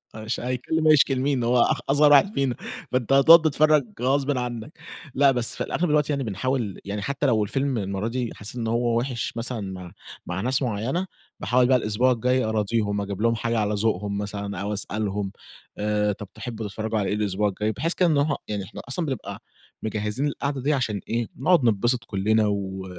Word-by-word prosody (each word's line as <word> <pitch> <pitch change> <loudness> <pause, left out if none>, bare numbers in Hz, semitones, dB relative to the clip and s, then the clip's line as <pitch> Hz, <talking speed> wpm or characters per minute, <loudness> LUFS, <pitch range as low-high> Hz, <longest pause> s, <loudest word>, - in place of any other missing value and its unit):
أش 110 +2 -4
هيتكلّم 130 +6 -1
هيشكي 150 -2 +5
لمين؟ 130 -1 0
هو 120 0 +3
أخ - - +2
أصغر 145 +1 +5
واحد 170 +9 +6
فينا 135 - 0 0.4
فأنت 125 0 0
هتقعد 160 +5 +8
تتفرّج 155 -1 +3 0.2
غصبٍ 135 +1 +1
عنّك 120 +2 -4 0.4
لأ، 140 0 +5
بس 120 -3 -1
في - - -2
الأغلب 175 -1 -1
الوقت 150 0 +2
يعني 140 -2 0
بنحاول 115 0 -2
يعني 100 +1 -4
حتى 140 +6 -2
لو 115 -5 +3
الفيلم 135 +5 -1
المَرّة 100 +1 -2
دي 120 0 -2
حسّيت 105 +4 -8
إن 115 -2 -3
هو 115 0 +1
وِحِش 120 -2 -3
مثلًا 115 0 -2
مع 90 -2 -9 0.3
مع 90 +1 -3
ناس 130 +5 +1
معيّنة، 130 - -1 0.3
باحاول 125 +6 +2
بقى 130 0 +5
الإسبوع 120 +3 +1
الجاي 125 +2 +1
أراضيهم 105 -1 0
أجيب 100 0 -5
لهم 115 0 +3
حاجة 115 +1 -1
على 105 0 0
ذوقهم 100 -1 -1
مثلًا 100 -1 -4
أو 105 +1 -2
أسألهم، 100 -1 -2 0.5
آآ 105 0 +1
طَب 100 +1 -7
تحبوا 110 -1 -6
تتفرّجوا 110 +2 -3
على 100 - -1
إيه - - 0
الإسبوع 105 0 0
الجاي 105 +3 -2
بحيث 165 +9 -1
كده 180 - +2
إن 150 - +2
هو 145 +1 +1
يعني 105 -2 -3
إحنا 95 - -9
أصلًا 165 +5 -1
بنبقى 135 -6 -5 0.4
مجهّزين 110 +5 -2
القاعدة 140 -2 -3
دي 150 +3 +1
عشان 110 -7 -1
إيه، 115 0 -1
نقعد 170 +3 +3
نتبسط 120 +3 +2
كلّنا 105 +1 +1
و 95 -2 -3
115 Hz, 195 wpm, -24 LUFS, 105-135 Hz, 0.5 s, هتقعد